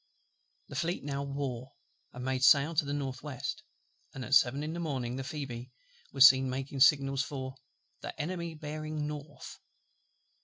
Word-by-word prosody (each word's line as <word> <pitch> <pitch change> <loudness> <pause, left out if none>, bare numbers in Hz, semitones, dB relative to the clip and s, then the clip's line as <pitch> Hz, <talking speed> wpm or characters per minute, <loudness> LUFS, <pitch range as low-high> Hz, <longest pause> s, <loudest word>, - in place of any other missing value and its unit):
The 140 - -8
Fleet 170 +3 -1
now 140 -1 -3
wore, 140 -2 -4 0.4
and 125 0 -7
made 130 -1 -1
sail 145 +4 +6
to 155 -2 +2
the 140 - -4
north 135 -2 -3
west; 145 -4 -5 0.5
and 130 -2 -5
at - - -4
seven 135 +2 +4
in 155 +1 -3
the 170 - -4
morning 130 -7 -2
the 135 - -4
Phoebe 130 -4 -6 0.4
was 135 0 +10
seen 130 0 +4
making 135 +1 -4
signals 135 -1 +5
for 135 -2 -5 0.5
"the - - -8
Enemy 170 0 -3
bearing 155 0 -4
north." 150 0 -8
140 Hz, 160 wpm, -31 LUFS, 130-150 Hz, 0.5 s, was